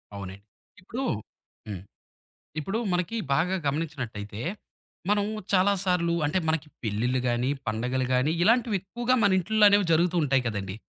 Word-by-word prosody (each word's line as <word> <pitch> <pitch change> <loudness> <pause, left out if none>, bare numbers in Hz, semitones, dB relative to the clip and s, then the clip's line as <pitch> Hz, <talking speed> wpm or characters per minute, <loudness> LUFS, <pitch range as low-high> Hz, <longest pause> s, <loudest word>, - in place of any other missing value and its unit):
అవునండి. 95 -1 -7 0.4
ఇప్పుడు 240 +8 -5 0.6
హ్మ్. 100 -4 -5 0.8
ఇప్పుడు 195 +8 -2 0.2
మనకి 180 +6 -1 0.2
బాగా 175 +6 +2
గమనించినట్టయితే. 130 -9 -4 0.7
మనం 205 -1 +3 0.3
చాలా 195 +2 +5
సార్లు 180 -3 +1
అంటే 150 +6 +1
మనకి 160 -1 0 0.2
పెళ్లిళ్లు 115 +4 0
గానీ, 120 +2 +1 0.2
పండగలు 125 +4 -1
గానీ, 130 +4 +2
ఇలాంటివి 230 +1 +3
ఎక్కువగా 240 +6 0
మన 200 - +5
ఇంటిల్లో 210 +4 +3
అనేవి 205 -1 +4
జరుగుతూ 170 +2 +2
ఉంటాయి 135 -2 +2
కదండీ. 100 -3 -3
160 Hz, 130 wpm, -27 LUFS, 120-195 Hz, 0.8 s, చాలా